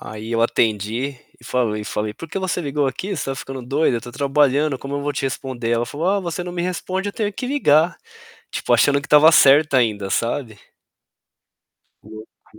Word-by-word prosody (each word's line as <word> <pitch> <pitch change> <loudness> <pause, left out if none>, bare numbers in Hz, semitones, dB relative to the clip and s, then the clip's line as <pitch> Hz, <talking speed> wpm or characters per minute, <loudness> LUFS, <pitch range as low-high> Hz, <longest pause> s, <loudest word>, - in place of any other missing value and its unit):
aí 110 +1 -8
eu 115 - +1
atendi 115 +4 0 0.2
e - - -18
falei 115 -4 -1
falei: 105 0 -3
"Por 165 - -9
que 195 - -4
você 185 -1 -2
ligou 145 -2 -1
aqui? 185 +9 -3
Você 145 - -3
tá 135 - -2
ficando 135 -1 -7
doida? 135 +1 +1
Eu - - -10
tô 120 +2 -10
trabalhando, 140 0 +1
como 135 +2 -6
eu 145 - -3
vou 145 +1 -2
te 140 - -4
responder?". 130 -3 -3
Ela 120 0 +1
falou: 155 +8 -2
"Ah, 200 +1 +2
você 175 -1 -4
não 180 - -6
me 175 -1 -3
responde, 185 +2 -3
eu - - -5
tenho 210 -2 -2
que 250 - -5
ligar". 165 - +3 0.6
Tipo, - - -1
achando 140 0 +4
que - - -10
estava 150 +2 +7
certa 145 -1 +5
ainda, 105 -5 0
sabe? 115 0 -2 1.4
"Tenho 110 +1 -11
que 110 - -25
140 Hz, 205 wpm, -21 LUFS, 120-160 Hz, 1.4 s, estava